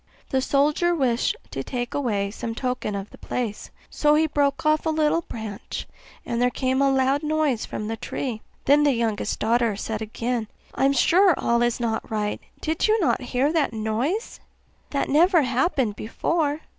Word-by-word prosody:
The 265 -2 +2
soldier 300 +6 +2
wished 250 -6 +1 0.2
to 135 - -4
take 245 - -4
away 205 -8 -1
some 225 +1 -5
token 250 -4 -2
of 200 +1 -5
the - - -14
place; 225 -4 -4 0.2
so 295 0 +3
he 315 +1 +4
broke 285 -1 0
off 310 +1 +2
a - - +3
little 310 +1 +2
branch, 220 -9 -7 0.4
and 235 0 -2
there 250 - +4
came 260 +1 0
a 275 - +4
loud 270 +1 +2
noise 305 -6 0
from 210 - -5
the 225 - -2
tree. 225 -1 -4 0.2
Then 290 +2 +5
the 290 -2 +4
youngest 225 -3 -1
daughter 230 -1 +1
said 220 +1 -4
again, 230 +1 -2 0.3
'I 265 - +1
am 275 - +4
sure 355 +6 +5
all 235 0 +1
is 240 0 +1
not 225 -2 -2
right 210 -1 -2 0.2
did 315 +1 -2 0.2
not 350 - +2
you 255 - -8
hear 270 +6 +1
that 305 -7 +1
noise? 225 - -2 0.5
That 280 - -1
never 335 +3 +4
happened 255 - +1
before. 295 +7 -1
260 Hz, 180 wpm, -24 LUFS, 225-300 Hz, 0.5 s, Then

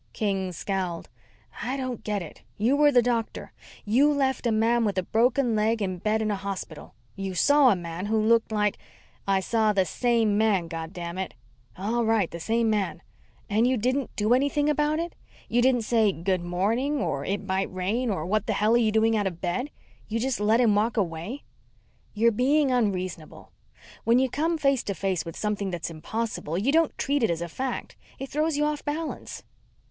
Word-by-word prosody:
King 195 -3 -1
scowled. 180 -1 -3 0.5
"I 255 +3 -2
don't 255 -3 -4
get 205 -3 -2
it. 155 - -12 0.2
You 235 +7 +2
were 295 0 +5
the 245 -3 +5
doctor. 235 -2 -2 0.3
You 260 +8 +4
left 265 -3 0
a - - +2
man 230 +2 +2
with 205 -3 -1
a 185 - +1
broken 240 +4 +2
leg 220 +2 +1
in 185 -3 -2
bed 215 +3 0
in 215 - 0
a - - 0
hospital. 195 -1 -7 0.2
You 195 -1 -4
saw 285 +7 +5
a 210 - +4
man 175 +2 -5
who 220 +1 +1
looked 225 +1 +3
like 210 -1 0 0.3
" - - -33
"I - - 0
saw 215 +1 +1
the 190 -2 +2
same 225 -2 +1
man, 200 -6 +2
goddamn 170 +2 -6
it!" 190 - -4 0.4
"All 225 +5 0
right 220 -5 +1
the 170 - -6
same 225 +6 +1
man. 210 -3 -1 0.4
And 220 +4 +2
you 255 0 +2
didn't 255 +4 0
do 215 +3 +2
anything 285 +3 +2
about 300 +1 +1
it? 335 +1 -3 0.3
You 240 - +2
didn't 245 -2 +3
say 220 -2 +3
Good 185 +1 -1
morning 220 +12 0
or 140 - -2
It 200 +6 -2
might 190 0 -1
rain 200 +7 -1
or 185 -7 -2
What 210 +3 0
the 220 - +1
hell 210 +3 +2
are - - +6
you 225 -2 +2
doing 220 +1 +3
out 205 -2 +1
of 170 -3 -5
bed? 190 +11 -2 0.4
You 225 +1 -2
just 255 0 -1
let 215 +3 +3
him 230 -4 +4
walk 215 +3 +1
away?" 185 - -3 0.7
"You're 230 +2 +4
being 270 +5 +2
unreasonable. 185 -9 -2 0.5
When 230 +1 +4
you 260 -1 +2
come 325 +4 0
face 275 -4 +2
to 200 - -2
face 185 -2 -1
with 165 - -7
something 205 -2 -2
that's 170 -2 -4
impossible, 170 0 -4
you 225 +9 +1
don't 325 0 +2
treat 280 0 0
it 225 - +2
as 170 0 -1
a - - -4
fact. 255 +9 -4 0.2
It 270 - -6
throws 305 +1 0
you 295 - +2
off 300 -1 -2
balance." 310 +2 -5
220 Hz, 200 wpm, -26 LUFS, 190-250 Hz, 0.7 s, are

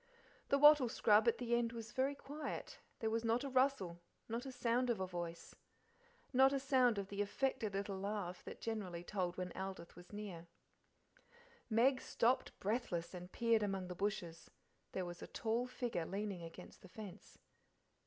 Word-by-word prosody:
The 280 - +5
wattle 295 -3 +8
scrub 215 0 +4
at 235 - +4
the 240 -1 -1
end 235 -1 +2
was 230 0 -6
very 270 +3 +1
quiet; 290 +2 -6 0.2
there 220 -1 +1
was 225 +1 0
not 230 +3 +2
a 280 - -3
rustle, 255 -10 +2 0.3
not 235 +4 -3
a - - -4
sound 245 0 +1
of 230 -4 +1
a 190 - 0
voice, 175 -2 -5 0.8
not 265 +1 +7
a 275 - +1
sound 255 -4 +4
of 195 -1 -3
the 200 0 -2
affected 215 0 -1
little 195 -1 -2
laugh 195 -3 -3
that - - -7
generally 195 -7 -3
told 180 -2 -2
when 180 -1 -3
Aldith 190 -2 -6
was 175 +1 -13
near. 195 -5 -6 1.2
Meg 250 +4 +4
stopped 245 +3 +1
breathless, 195 -6 -1
and 180 0 -8
peered 230 -2 +3
among 195 -3 -1
the - - -3
bushes; 175 -4 -3 0.4
there 185 - -2
was 175 0 -7
a - - -6
tall 230 +2 -1
figure 240 -9 -2
leaning 200 -1 -3
against 165 0 -10
the 185 - -13
fence. 205 -1 -10
215 Hz, 175 wpm, -38 LUFS, 185-245 Hz, 1.2 s, wattle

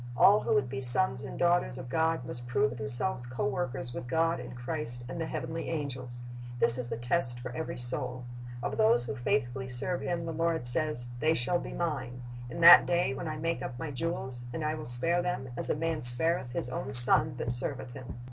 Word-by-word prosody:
All 205 +2 +5
who - - -1
would 140 -3 0
be 130 +2 -6
sons 130 +1 +4
and 135 - -9
daughters 175 -7 0
of 130 -1 -9
God 160 0 -2
must 120 0 -6
prove 135 +1 -1
themselves 120 - +2
co 120 0 -5
workers 130 -2 -5
with 120 - -8
God 165 +4 -1
and - - -10
Christ 120 -1 -6
and 145 +6 -7
the 160 - -4
heavenly 165 +1 -6
angels. 130 -6 -6 0.4
This 120 +1 +2
is 120 -1 -5
the - - -5
test 120 0 -1
for 125 0 -8
every 160 +6 -6
soul. 125 +1 -4 0.4
Of - - -4
those 215 - +2
who 140 - -6
faithfully 130 0 -3
serve 130 +8 -4
Him 170 -1 -4
the 165 - -6
Lord 165 -4 -2
says, 120 0 +5
"They 160 +3 +1
shall 165 +8 -1
be - - -9
Mine... 130 -7 -5 0.3
in 170 - -7
that 170 +1 +8
day 175 -6 0
when 145 +5 -7
I 155 0 -5
make 165 +2 -4
up 120 - -7
My 150 +3 -6
jewels; 130 -4 -5
and 155 +4 -5
I 155 - -2
will 155 0 -8
spare 145 +9 +1
them, 175 -8 -5
as - - 0
a - - 0
man 165 +1 -3
spareth 125 +2 +4
his 120 - -4
own 130 +2 -6
son 135 +4 +9
that 120 - -3
serveth 125 +1 -2
him." 125 -1 -11
130 Hz, 215 wpm, -28 LUFS, 120-165 Hz, 0.4 s, son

